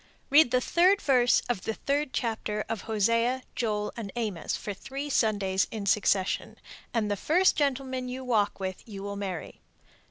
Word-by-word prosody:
Read 290 -2 +7
the 250 - +3
third 365 +9 +3
verse 250 -6 +3
of 240 -6 -1
the 220 - -3
third 285 0 -1
chapter 220 -5 -2
of 225 -2 -3
Hosea, 230 +4 +2
Joel, 210 -3 -1
and 215 -4 -6
Amos 210 -9 -2
for 205 - -5
three 275 +8 -6
Sundays 200 -5 +1
in 215 -3 -5
succession, 200 -1 +1 0.3
and 215 -3 0
the - - +1
first 350 - +3
gentleman 260 -3 -1
you 260 +1 -5
walk 220 -6 +1
with 185 -1 -4
you 195 -2 -7
will 200 0 -4
marry. 195 -4 -5
230 Hz, 165 wpm, -28 LUFS, 205-260 Hz, 0.3 s, Read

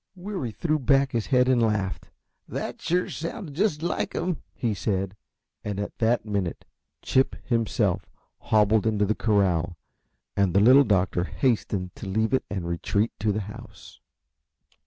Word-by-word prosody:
Weary 185 - -4
threw 155 +6 0
back 135 0 +3
his 115 -2 -1
head 125 -2 +3
and 130 -2 +3
laughed. 105 -4 -1 0.4
"That - - -5
sure 180 +2 +1
sounds 165 +2 -5
just 160 0 0
like 175 - -1
him," 180 -2 -2
he 115 -4 -2
said, 95 -1 -2 0.5
and 100 -1 -3
at 100 - -4
that 115 0 +2
minute 100 -5 -2 0.4
Chip 130 0 +2
himself 115 -3 0 0.3
hobbled 110 0 +3
into 105 -2 +2
the 105 - +1
corral, 95 -6 +1 0.6
and 100 -3 +1
the - - +7
Little 130 +7 +7
Doctor 90 -4 +1
hastened 100 -7 -1
to - - -7
leave 110 +5 0
it 130 - +2
and 95 -4 -3
retreat 100 +6 0
to 105 +1 +1
the 105 +1 -1
house. 105 +1 -11
110 Hz, 155 wpm, -26 LUFS, 100-135 Hz, 0.6 s, the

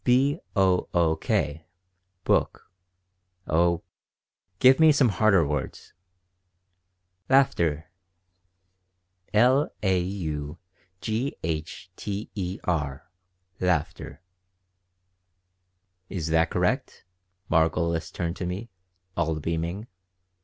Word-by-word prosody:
"B 135 +5 +3 0.2
o 95 -3 +2
o 85 -2 +3
k 75 +1 -1 0.6
book. - - 0 0.7
Oh, 85 +1 +2 0.7
give 130 - +6
me 160 -1 +7
some 140 -4 +4
harder 100 -3 +3
words." 75 -2 -4 1.4
"Laughter." 85 - +2 1.4
"L 125 +7 +4
a 95 -2 +3
u 80 -5 -4 0.4
g 115 +6 -2
h 80 +2 -4
t 100 +2 -5
e 95 -3 -4
r 75 -1 -2 0.5
laughter." 90 -1 -2 1.9
"Is 85 -4 -3
that 80 +1 +3
correct?" - - -1 0.5
Margolis 80 0 +1
turned 85 0 -3
to 90 - -3
me, 100 +6 -5 0.4
all 80 0 0
beaming. 85 +6 -3
90 Hz, 90 wpm, -26 LUFS, 80-105 Hz, 1.9 s, me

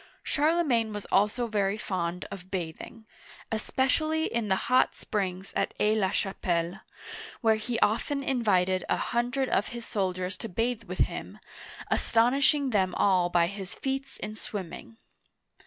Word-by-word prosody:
Charlemagne 290 -8 +2
was 205 -1 -5
also 210 +5 +3
very 205 -2 0
fond 180 -4 -3
of 185 -1 -8
bathing, 185 +5 -5 0.5
especially 310 +8 +1
in 230 -2 -1
the 190 - +3
hot 255 +1 +3
springs 190 -3 -3
at - - 0
Aix 210 +1 +3
la 195 -3 +2
Chapelle 175 -4 0
(sha - - -10
pel'), 195 - -13 0.6
where 220 -3 +4
he 230 +2 -3
often 275 +6 +1
invited 190 -8 +2
a - - +2
hundred 245 +3 0
of 200 - +2
his 235 -1 -7
soldiers 185 -3 -2
to 225 - -6
bathe 230 +4 -1
with - - -2
him, - - -2 0.5
astonishing 270 +4 +3
them 190 -4 +2
all 185 -3 +3
by 175 -1 +4
his 195 0 -6
feats 270 0 -3
in 215 +1 -5
swimming. 210 +2 -7
215 Hz, 150 wpm, -28 LUFS, 190-245 Hz, 0.6 s, where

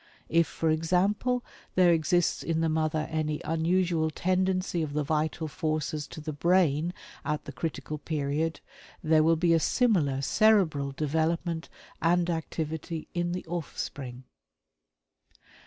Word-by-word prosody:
If, 165 0 +3
for 160 -1 0
example, 195 +10 +1 0.3
there 180 -2 +6
exists 165 +2 +2
in 165 -1 -1
the 165 - +2
mother 155 0 0
any 155 -1 -1
unusual 165 0 +1
tendency 185 +1 0
of 150 -2 -3
the 150 0 0
vital 155 +2 -1
forces 155 -1 -2
to 160 - -9
the 155 0 -5
brain 170 0 +2 0.3
at 150 -1 -2
the - - -6
critical 150 0 -4
period, 155 +1 -2 0.4
there 155 -1 +4
will 165 +1 +4
be 170 +1 +3
a 165 - +4
similar 155 - +2
cerebral 165 -8 +3
development 160 +3 -1 0.3
and 175 +1 +2
activity 160 0 -4
in 175 0 -1
the 180 - -4
offspring." 140 -6 -5
160 Hz, 130 wpm, -28 LUFS, 155-175 Hz, 0.4 s, there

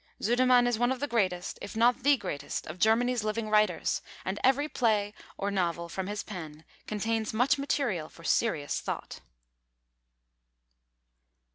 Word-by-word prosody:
Sudermann 245 +2 +4
is 245 -2 0
one 245 +1 +2
of 260 - -2
the 290 - -1
greatest, 185 -8 -1
if - - -7
not 240 +3 +3
the 280 +2 +4
greatest, 145 - -4
of 155 +4 -8
Germany's 235 +3 +3
living 215 0 -2
writers, 210 -5 +2 0.2
and 190 +2 -2
every 270 +3 +3
play 215 -7 +1 0.2
or 200 +1 -2
novel 170 -3 -1
from 190 +2 -4
his 205 0 -3
pen 160 -5 -8 0.2
contains 220 +1 -1
much 250 +5 +3
material 245 - -1
for 165 - -16
serious 160 -6 +1
thought. - - -5
215 Hz, 145 wpm, -29 LUFS, 185-245 Hz, 0.2 s, Sudermann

